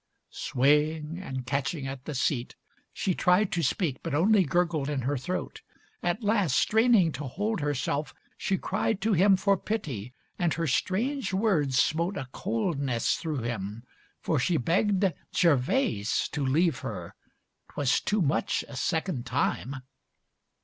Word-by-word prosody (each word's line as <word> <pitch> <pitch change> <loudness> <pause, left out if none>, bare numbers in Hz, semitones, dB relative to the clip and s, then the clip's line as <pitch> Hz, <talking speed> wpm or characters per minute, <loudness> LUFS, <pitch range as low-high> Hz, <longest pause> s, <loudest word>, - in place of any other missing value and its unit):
XLVII - - -50
Swaying 150 +5 +1
and 130 -8 -5
catching 140 +3 -2
at 135 0 -6
the 150 - -5
seat, 125 -1 -1 0.4
she 185 - -1
tried 180 +4 +3
To 170 - 0
speak, 150 -1 0
but - - -3
only 195 +5 +4
gurgled 165 -2 0
in 145 -3 -1
her 140 +4 -1
throat. 180 +8 -4 0.4
At 175 +6 -1
last, 205 - +2
straining 220 -6 +4
to 145 - -6
hold 205 - -2
herself, 145 0 -1 0.2
she 190 - -1
cried 200 +2 -1
To 220 +1 +2
him 190 +2 +5
for 200 +1 +2
pity, 135 - -4 0.2
and 175 -2 +1
her 165 - -1
strange 215 - 0
words 165 - +2
smote 170 +8 +1
A 130 - -4
coldness 160 - -1
through 155 -7 -3
him, 110 -1 -4 0.4
for 155 - 0
she 165 +6 +1
begged 190 - +2 0.2
Gervase 145 - +2
To 150 - -3
leave 145 +2 +2
her, 90 -11 -6 0.6
'twas 140 -3 +1
too 210 -2 0
much 140 - 0
a 140 - -10
second 160 -4 -1
time. 130 0 -1
160 Hz, 150 wpm, -28 LUFS, 135-190 Hz, 0.6 s, him